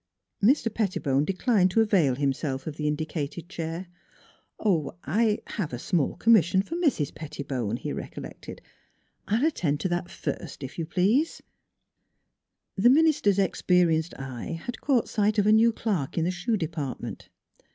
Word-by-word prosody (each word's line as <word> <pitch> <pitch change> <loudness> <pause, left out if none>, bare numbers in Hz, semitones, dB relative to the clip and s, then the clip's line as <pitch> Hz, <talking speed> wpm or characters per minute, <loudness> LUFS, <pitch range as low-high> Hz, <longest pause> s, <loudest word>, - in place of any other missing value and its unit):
Mr. 230 -1 +3
Pettibone 150 - 0
declined 195 +1 +2
to 205 - +1
avail 190 - +3
himself 135 0 -2
of 155 - -5
the 150 0 -2
indicated 155 +1 -3
chair. 170 0 -5 0.4
" - - -19
er 165 -9 +2
I 210 - +2
have 180 - -4
a - - -2
small 150 +4 0
commis 225 -7 +5
sion 190 +3 +1
for 330 - -6
Mrs. 290 - 0
Pettibone," 135 -7 -4
he - - -4
recollected. - - -8 0.3
" - - -44
I 215 +3 +2
will 280 - +2
attend 150 - -1
to 185 - 0
that 175 0 -2
first, 145 -1 -5
if 135 +5 -7
you 160 - -2
please." 210 - +1 1.3
The 210 +5 +5
minister's 280 -9 +4
experienced 175 -4 +2
eye 135 +4 -6
had 245 - -5
caught 265 -5 +2
sight 210 0 +1
of 205 - +3
a 210 - +5
new 225 +2 +6
clerk 195 - -2
in 165 - +2
the 180 - +1
shoe 185 +5 -1
department. 155 -6 -5
180 Hz, 160 wpm, -27 LUFS, 150-215 Hz, 1.3 s, new